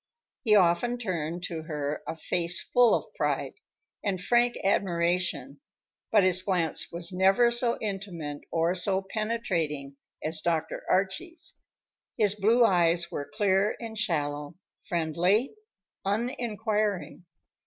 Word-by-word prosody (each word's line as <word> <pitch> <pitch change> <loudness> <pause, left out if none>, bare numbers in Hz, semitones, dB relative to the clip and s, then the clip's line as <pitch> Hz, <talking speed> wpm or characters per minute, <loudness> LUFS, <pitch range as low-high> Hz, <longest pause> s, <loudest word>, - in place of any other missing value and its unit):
He 215 -4 +4
often 200 +6 +3
turned 175 -6 -3
to 165 -2 -4
her 150 -2 -4
a - - -3
face 170 +2 -1
full 245 -2 +4
of - - -5
pride, - - -1 0.5
and 195 -3 -1
frank 240 +5 +2
admiration, 175 -7 0 0.5
but 210 -3 +5
his 185 0 +5
glance 180 -5 0
was 170 +1 -2
never 195 +6 +4
so 240 0 +3
intimate 185 -8 -4
or 165 +1 +1
so 190 +1 +1
penetrating 165 -10 -2 0.3
as 155 0 -3
Dr. 160 -2 -1
Archie's. 315 - -1 0.6
His 205 -2 +4
blue 225 +4 +4
eyes 170 -3 +2
were 145 - -5
clear 205 0 +2
and 225 -2 -7
shallow, 150 -7 -2 0.3
friendly, 175 - +1 0.5
uninquiring. 210 -3 -2
185 Hz, 120 wpm, -28 LUFS, 170-215 Hz, 0.6 s, but